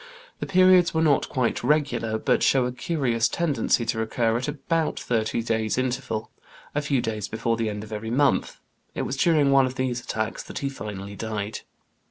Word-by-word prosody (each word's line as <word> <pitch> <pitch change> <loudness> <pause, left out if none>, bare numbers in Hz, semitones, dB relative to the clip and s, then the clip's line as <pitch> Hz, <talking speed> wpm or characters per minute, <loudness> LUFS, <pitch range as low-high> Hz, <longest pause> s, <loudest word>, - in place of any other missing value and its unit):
The - - -4
periods 185 -2 +5
were 160 - +3
not 150 -3 +3
quite 125 -3 -1
regular, 140 -7 +1
but - - +1
show 130 -2 +3
a 125 - -1
curious 125 -5 0
tendency 145 -6 +1
to 110 - -1
recur 115 0 0
at 125 - -3
about 160 +2 -1
thirty 115 -1 -1
days' 110 -1 0
interval, 125 -4 -2 0.4
a 145 - 0
few 140 -3 0
days 110 -3 -3
before 115 +1 -1
the 115 -1 -1
end 105 0 -5
of 110 0 -9
every 110 +1 -4
month; 140 +4 +1 0.4
it - - -1
was - - -3
during 150 -2 +3
one 135 -1 +5
of 130 - -6
these 125 -2 -1
attacks 110 -1 -3
that - - -9
he 140 - -2
finally 100 -6 -7
died. 110 -1 -4
125 Hz, 190 wpm, -25 LUFS, 110-140 Hz, 0.4 s, periods